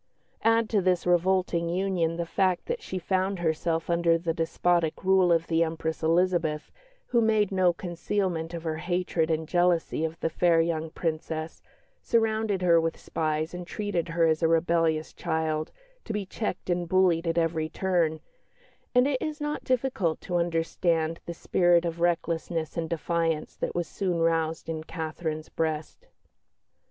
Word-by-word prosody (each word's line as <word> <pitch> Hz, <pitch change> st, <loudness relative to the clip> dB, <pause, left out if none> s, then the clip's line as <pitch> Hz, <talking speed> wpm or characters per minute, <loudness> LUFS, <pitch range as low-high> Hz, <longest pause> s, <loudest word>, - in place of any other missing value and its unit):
Add 225 Hz, 0 st, +3 dB
to 210 Hz, -3 st, +3 dB
this 180 Hz, -1 st, +1 dB
revolting 175 Hz, -1 st, +2 dB
union 175 Hz, -2 st, 0 dB
the 170 Hz, -, -2 dB
fact 185 Hz, +1 st, +1 dB
that 480 Hz, 0 st, -3 dB
she 190 Hz, -, -5 dB
found 190 Hz, +2 st, 0 dB
herself 165 Hz, 0 st, -1 dB
under 170 Hz, -1 st, +3 dB
the 165 Hz, 0 st, -2 dB
despotic 165 Hz, 0 st, 0 dB
rule 190 Hz, -2 st, +4 dB
of 165 Hz, -1 st, +3 dB
the 165 Hz, 0 st, +2 dB
Empress 160 Hz, -1 st, -3 dB
Elizabeth, 165 Hz, -2 st, +1 dB, 0.4 s
who 235 Hz, -, +3 dB
made 215 Hz, -3 st, +2 dB
no 185 Hz, -2 st, +3 dB
concealment 175 Hz, -1 st, -2 dB
of 165 Hz, -, -6 dB
her 160 Hz, -1 st, -2 dB
hatred 175 Hz, -1 st, -1 dB
and 160 Hz, 0 st, -1 dB
jealousy 175 Hz, -2 st, +1 dB
of 160 Hz, +1 st, -3 dB
the 165 Hz, -, 0 dB
fair 170 Hz, 0 st, +3 dB
young 165 Hz, -1 st, 0 dB
Princess, 160 Hz, 0 st, -4 dB, 0.4 s
surrounded 220 Hz, -4 st, +1 dB
her 170 Hz, -2 st, +5 dB
with 165 Hz, 0 st, -2 dB
spies, 155 Hz, +1 st, -2 dB
and 180 Hz, 0 st, -6 dB
treated 200 Hz, -4 st, -2 dB
her 165 Hz, 0 st, +2 dB
as 160 Hz, 0 st, +2 dB
a 165 Hz, -, +4 dB
rebellious 165 Hz, -1 st, +1 dB
child, 155 Hz, 0 st, -2 dB, 0.3 s
to 225 Hz, -, -4 dB
be 210 Hz, -2 st, -2 dB
checked 190 Hz, -1 st, -4 dB
and 175 Hz, -1 st, -1 dB
bullied 180 Hz, -2 st, +3 dB
at 165 Hz, -, 0 dB
every 160 Hz, -1 st, 0 dB
turn 170 Hz, -3 st, 0 dB, 0.7 s
and 250 Hz, +2 st, +5 dB
it 270 Hz, -3 st, -1 dB
is 305 Hz, 0 st, -3 dB
not 295 Hz, 0 st, -3 dB
difficult 250 Hz, -10 st, 0 dB
to 180 Hz, -, -4 dB
understand 165 Hz, -1 st, 0 dB
the 170 Hz, -, -3 dB
spirit 175 Hz, 0 st, +3 dB
of 170 Hz, 0 st, -3 dB
recklessness 165 Hz, -2 st, -1 dB
and 165 Hz, -1 st, -2 dB
defiance 165 Hz, -1 st, -1 dB
that -, -, -4 dB
was 175 Hz, -2 st, -1 dB
soon 180 Hz, -1 st, -2 dB
roused 165 Hz, -1 st, 0 dB
in 160 Hz, -1 st, -4 dB
Catherine's 160 Hz, -1 st, -4 dB
breast. 155 Hz, -1 st, -3 dB
170 Hz, 160 wpm, -27 LUFS, 160-185 Hz, 0.7 s, her